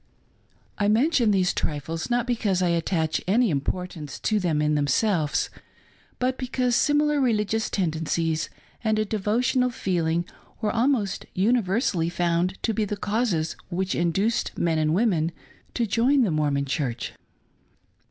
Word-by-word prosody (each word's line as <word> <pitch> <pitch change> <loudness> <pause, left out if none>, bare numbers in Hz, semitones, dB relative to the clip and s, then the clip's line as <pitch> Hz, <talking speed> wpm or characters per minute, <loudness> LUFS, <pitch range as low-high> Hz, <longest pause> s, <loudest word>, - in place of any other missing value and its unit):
33 205 - +2
I - - +3
mention 240 +1 +3
these 185 -3 +2
trifles, 160 - -3
not 240 0 +1
because 210 -7 0
I 175 - +2
attach 165 -1 0
any 225 +2 +3
import 180 +6 -2
ance 150 -4 -7
to 215 -1 +1
them 170 -5 0
in 150 0 +2
themselves, 150 +3 +1 0.7
but 255 +1 -1
because 250 -1 0
similar 295 +1 +3
religious 220 -3 +1
tendencies 160 -2 -1 0.3
and 220 -1 +1
a 215 - +1
devotional 235 +5 +1
feeling 170 -6 -1 0.3
were 215 -2 0
almost 230 -5 0
universally 195 - +1
found 175 +1 0
to 225 - +1
be 215 - 0
the 210 0 -3
causes 205 -7 -1
which 185 +2 -1
induced 190 +7 0
men 165 -2 +1
and 155 +1 +2
women 175 -7 +2 0.4
to 235 - +1
join 245 +6 +3
the 205 - +1
Mormon 145 -2 +1
Church. 130 -4 -3
195 Hz, 145 wpm, -25 LUFS, 165-230 Hz, 0.7 s, I